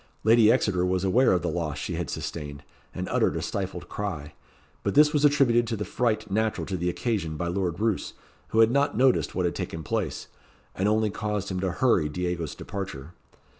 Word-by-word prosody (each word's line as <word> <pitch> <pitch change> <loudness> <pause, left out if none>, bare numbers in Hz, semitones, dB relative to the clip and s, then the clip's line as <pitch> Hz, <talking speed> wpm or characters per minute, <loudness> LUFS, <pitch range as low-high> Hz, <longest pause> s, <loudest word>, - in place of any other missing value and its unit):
Lady 110 0 +6
Exeter 90 -4 +1
was 90 0 0
aware 120 +7 +4
of 90 -2 +1
the - - -1
loss 80 -3 -2
she 80 - -4
had 85 -4 -3
sustained, 75 -3 -5 0.3
and - - -5
uttered - - +1
a - - -2
stifled - - -4
cry; 80 -8 -5 0.5
but - - -2
this 150 +1 +6
was 150 -1 +2
attributed 130 -5 +4
to 115 - -1
the 105 -1 -4
fright 115 -4 -1
natural 110 +2 0
to 95 - -3
the 90 0 -1
occasion 90 -6 -2
by 85 - -2
Lord 90 -1 -2
Roos, 110 -2 -1 0.3
who 110 - +3
had 115 0 +5
not 140 -4 +1
noticed 130 0 +3
what 90 - 0
had 85 - 0
taken 80 -1 -5
place, - - -2 0.5
and 95 +2 0
only 110 0 +2
caused 105 -1 -3
him 95 -1 -2
to 95 0 0
hurry 90 -7 +2
Diego's 90 -1 -3
departure. 90 -7 -6
95 Hz, 200 wpm, -26 LUFS, 85-110 Hz, 0.5 s, Lady